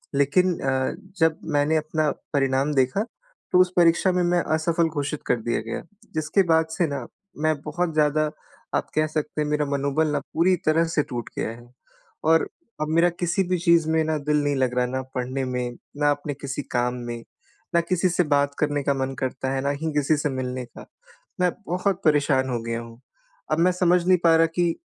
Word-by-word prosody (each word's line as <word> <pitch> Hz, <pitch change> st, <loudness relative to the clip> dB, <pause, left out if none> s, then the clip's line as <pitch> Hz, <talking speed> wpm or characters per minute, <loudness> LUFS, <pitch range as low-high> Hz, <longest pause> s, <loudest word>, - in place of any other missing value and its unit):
लेकिन 165 Hz, +6 st, +3 dB
अ, 130 Hz, -1 st, 0 dB, 0.3 s
जब 160 Hz, -1 st, +3 dB, 0.2 s
मैंने 145 Hz, +2 st, +2 dB
अपना 155 Hz, 0 st, 0 dB, 0.2 s
परिणाम 135 Hz, +1 st, +1 dB
देखा 135 Hz, -, +1 dB, 0.5 s
तो 180 Hz, -, +5 dB
उस 185 Hz, -1 st, +2 dB
परीक्षा 170 Hz, +2 st, +4 dB
में 180 Hz, 0 st, +1 dB
मैं 175 Hz, 0 st, +2 dB, 0.2 s
असफल 165 Hz, +1 st, +1 dB
घोषित 145 Hz, -1 st, -3 dB
कर -, -, +2 dB
दिया 120 Hz, +1 st, -1 dB
गया 115 Hz, +1 st, -5 dB, 0.3 s
जिसके 155 Hz, +5 st, +2 dB
बाद 160 Hz, 0 st, +4 dB
से 170 Hz, +2 st, +1 dB
न 135 Hz, -4 st, -3 dB, 0.4 s
मैं 155 Hz, 0 st, +3 dB
बहुत 165 Hz, +3 st, -2 dB
ज़्यादा 155 Hz, 0 st, +3 dB, 0.5 s
आप -, -, 0 dB
कह 155 Hz, 0 st, +2 dB
सकते 155 Hz, 0 st, -3 dB
हैं 150 Hz, -, 0 dB
मेरा 150 Hz, 0 st, +1 dB
मनोबल 140 Hz, +2 st, +1 dB
न -, -, +1 dB
पूरी 180 Hz, +3 st, +3 dB
तरह 160 Hz, +2 st, +3 dB
से 150 Hz, -, +2 dB
टूट 120 Hz, -2 st, -4 dB
गया -, -, -1 dB
है 120 Hz, +1 st, -10 dB, 0.6 s
और 165 Hz, -, +4 dB, 0.3 s
अब 155 Hz, -, 0 dB
मेरा 170 Hz, +1 st, +5 dB
किसी 175 Hz, +2 st, -1 dB
भी 185 Hz, -, +2 dB
चीज़ 170 Hz, -2 st, +3 dB
में 160 Hz, 0 st, +2 dB
न 155 Hz, -, +1 dB
दिल 150 Hz, -1 st, +2 dB
नहीं 145 Hz, 0 st, +1 dB
लग 130 Hz, -2 st, 0 dB
रहा 125 Hz, -, +3 dB
ना 130 Hz, +1 st, -2 dB
पढ़ने 130 Hz, +1 st, -2 dB
में, 125 Hz, -1 st, -3 dB, 0.2 s
ना 145 Hz, 0 st, +3 dB
अपने 145 Hz, 0 st, -3 dB
किसी 140 Hz, +1 st, -5 dB
काम 125 Hz, 0 st, +1 dB
में, 120 Hz, -1 st, -6 dB, 0.5 s
ना 170 Hz, -, +5 dB
किसी 180 Hz, +1 st, +1 dB
से 180 Hz, +1 st, +2 dB
बात 145 Hz, -2 st, +1 dB
करने 145 Hz, -1 st, 0 dB
का 140 Hz, -, +2 dB
मन 135 Hz, 0 st, -2 dB
करता 130 Hz, 0 st, -2 dB
है, 135 Hz, -, -1 dB
ना 140 Hz, -, 0 dB
ही 150 Hz, +3 st, -2 dB
किसी 150 Hz, +1 st, +2 dB
से 145 Hz, +1 st, -1 dB
मिलने 130 Hz, -1 st, -3 dB
का। -, -, -13 dB, 0.6 s
मैं 180 Hz, -1 st, +3 dB, 0.2 s
बहुत 185 Hz, +1 st, 0 dB
परेशान 145 Hz, -3 st, +3 dB
हो 120 Hz, -2 st, -1 dB
गया 115 Hz, 0 st, -2 dB
हूँ 115 Hz, 0 st, -12 dB, 0.5 s
अब -, -, +2 dB
मैं 180 Hz, +2 st, +4 dB
समझ 180 Hz, -1 st, +2 dB
नहीं 185 Hz, -1 st, +6 dB
पा 165 Hz, -1 st, +6 dB
रहा 165 Hz, 0 st, +5 dB
कि 175 Hz, -2 st, +1 dB
150 Hz, 205 wpm, -24 LUFS, 135-165 Hz, 0.6 s, नहीं